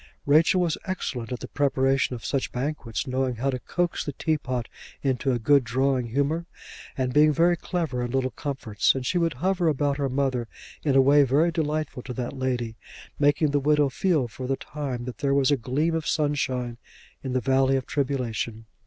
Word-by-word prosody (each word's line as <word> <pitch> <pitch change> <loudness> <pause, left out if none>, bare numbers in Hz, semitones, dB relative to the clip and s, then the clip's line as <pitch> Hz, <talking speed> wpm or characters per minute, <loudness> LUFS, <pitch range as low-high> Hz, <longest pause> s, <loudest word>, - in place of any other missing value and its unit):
Rachel 155 +5 +4
was 170 -3 0
excellent 130 - -4
at 125 - -4
the 125 - -6
preparation 135 -2 +1
of 115 - -9
such 135 -2 -1
banquets, 130 -2 -3
knowing 130 -1 -1
how 135 +4 0
to 130 - -3
coax 175 +6 -1
the 145 - -4
teapot 130 -6 -2 0.4
into 135 0 +1
a 125 - +1
good 140 +4 +4
drawing 130 +1 0
humour, 145 +7 -1 0.5
and 130 -1 -1
being 150 +2 +6
very 170 +4 +3
clever 165 -7 -2
in 120 - -3
little 130 0 0
comforts; 130 -8 0
and 130 -1 -3
she 175 - +1
would 165 -2 +1
hover 180 +5 0
about 145 -2 +1
her 140 -2 -1
mother, 130 -3 0 0.4
in 140 -3 +2
a 135 - +7
way 140 +2 +6
very 145 +5 +3
delightful 155 -4 -2
to 125 - -7
that 125 +2 -4
lady, 125 -4 -2 0.4
making 145 +1 +3
the 145 - +2
widow 145 0 +3
feel 155 -2 +1
for 125 +3 -7
the 135 - +1
time 135 -5 -5
that 125 - -7
there 140 -1 +1
was 140 0 +3
a - - +5
gleam 140 +6 -1
of 160 -1 -2
sunshine 130 -5 -1 0.4
in 130 -2 -3
the 130 - +2
valley 135 +2 +2
of 130 -1 -1
tribulation. 125 -5 -2
135 Hz, 195 wpm, -25 LUFS, 125-150 Hz, 0.5 s, a